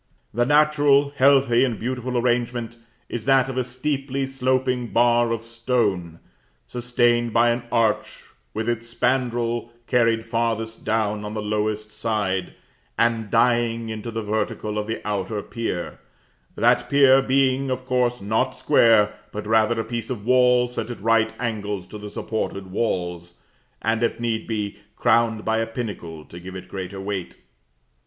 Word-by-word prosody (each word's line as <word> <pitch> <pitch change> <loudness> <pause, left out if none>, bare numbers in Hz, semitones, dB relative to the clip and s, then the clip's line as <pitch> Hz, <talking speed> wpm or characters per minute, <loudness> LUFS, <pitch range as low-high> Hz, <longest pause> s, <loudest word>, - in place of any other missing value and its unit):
The 120 +2 +1
natural, 145 -1 +4
healthy, 135 -3 +4
and 120 -5 0
beautiful 125 +1 -2
arrangement 120 -1 0 0.3
is 120 - -5
that 135 -1 +4
of 135 - -5
a 130 - +1
steeply 135 +2 -2
sloping 130 -2 0
bar 120 0 +3
of 115 -1 -1
stone, 115 -8 -1 0.5
sustained 120 -1 +1
by 120 0 +4
an 120 0 -3
arch 115 -3 +2 0.4
with 110 - -3
its 120 0 -2
spandril 120 -2 0 0.2
carried 115 -2 +2
farthest 115 -1 -2
down 105 -1 0
on 105 +1 -5
the - - -2
lowest 105 0 -2
side, 105 -4 -2 0.4
and 115 -2 +1
dying 115 -1 +2
into 110 +1 -5
the 115 -1 -4
vertical 105 0 -2
of 105 - -4
the 110 -1 -4
outer 105 +1 -2
pier; 115 -7 -4 0.6
that - - +2
pier 135 -1 +6
being, 135 0 +2
of 130 0 -3
course, 125 -1 +1
not 110 +3 0
square, 110 -3 +4 0.2
but 105 0 -5
rather 110 +1 +2
a - - 0
piece 115 -1 -4
of 115 -5 -5
wall 125 0 +4
set 125 0 -5
at 120 - -6
right 115 +1 +2
angles 105 -5 -3
to 105 - -10
the 105 0 -7
supported 100 -3 -4
walls, 90 -4 -3 0.4
and, 110 +1 +1
if 115 - 0
need 115 -2 -2
be, 105 -2 -3 0.2
crowned 115 -2 +2
by 110 0 +1
a 115 - -1
pinnacle 95 -10 -6
to 85 - -11
give 95 +1 -9
it 95 0 -8
greater 95 0 -6
weight. 95 -2 -4
115 Hz, 155 wpm, -23 LUFS, 105-125 Hz, 0.6 s, pier